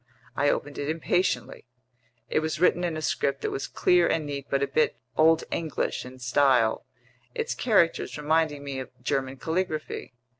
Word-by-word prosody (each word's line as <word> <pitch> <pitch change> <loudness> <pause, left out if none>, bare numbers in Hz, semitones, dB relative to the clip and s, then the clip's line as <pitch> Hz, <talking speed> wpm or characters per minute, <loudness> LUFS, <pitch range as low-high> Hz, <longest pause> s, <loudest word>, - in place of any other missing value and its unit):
I 145 - +2
opened 145 0 -2
it 145 - -2
impatiently. 165 -2 -1 0.6
It - - +1
was 155 0 -2
written 175 0 +3
in 170 -3 -1
a 155 - -5
script 140 -2 0
that - - -2
was 135 0 -3
clear 180 -1 +3
and 155 - 0
neat 140 -1 -5
but 140 0 +1
a - - +1
bit 155 - +1 0.2
"Old 160 +1 +5
English" 160 -5 -2
in 130 +1 -10
style, 125 -2 +2 0.5
its 460 -1 -1
characters 205 -12 +2
reminding 150 -1 +1
me 140 -2 -4
of 130 - -6
German 135 -1 -1
calligraphy. 160 -4 -3
150 Hz, 165 wpm, -27 LUFS, 135-165 Hz, 0.6 s, Old